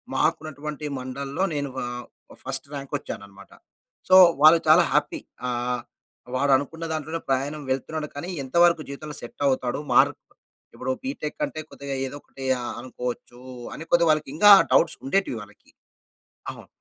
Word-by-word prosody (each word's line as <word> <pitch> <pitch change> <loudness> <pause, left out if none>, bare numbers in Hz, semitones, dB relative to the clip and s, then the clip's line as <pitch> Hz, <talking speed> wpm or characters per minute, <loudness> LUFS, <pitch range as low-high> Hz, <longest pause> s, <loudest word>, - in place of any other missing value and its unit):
మాకున్నటువంటి 150 -1 -2
మండల్‌లో 140 +6 -4
నేను 145 -1 -2 0.2
ఆహ్, 120 0 -6 0.3
ఆ - - -15
ఫస్ట్ 135 +1 -3
ర్యాంక్ 140 0 -7
వచ్చాను 120 -7 -7
అనమాట. 100 0 -16 0.6
సో 185 - +7 0.3
వాళ్ళు 155 +2 +8
చాలా 160 +3 +7
హ్యాపీ, 150 0 +1 0.3
ఆహ్, 125 0 -2 0.5
వాడు 140 +2 +2
అనుకున్న 160 +4 -6
దాంట్లోనే 160 +1 -4
ప్రయాణం 140 +3 -1
వెళ్తున్నాడు, 150 +4 -2
కానీ 145 +5 -5
ఎంతవరకు 170 +4 +3
జీవితంలో 150 +2 -7
సెట్ 120 - -11
అవుతాడు? 130 -1 -1
మార్క్ - - +4 0.6
ఇప్పుడు 130 +1 -3
బీటెక్ 260 - -5
అంటే 155 - -7
కొద్దిగా 140 -1 -6
ఏదో 130 - -8
ఒకటి 135 - -10 0.2
ఆహ్, 120 - -4
అనుకోవచ్చు 125 -1 -6 0.3
అని - - -7
కొద్దిగా 170 -1 +4
వాళ్ళకి 155 -2 0
ఇంగా 205 +6 +6
ఆ - - +6
డౌట్స్ 165 - +4
ఉండేటివి 140 -3 0
వాళ్లకి. 105 0 -16 0.8
అవును. - - -13
140 Hz, 150 wpm, -25 LUFS, 130-155 Hz, 0.8 s, వాళ్ళు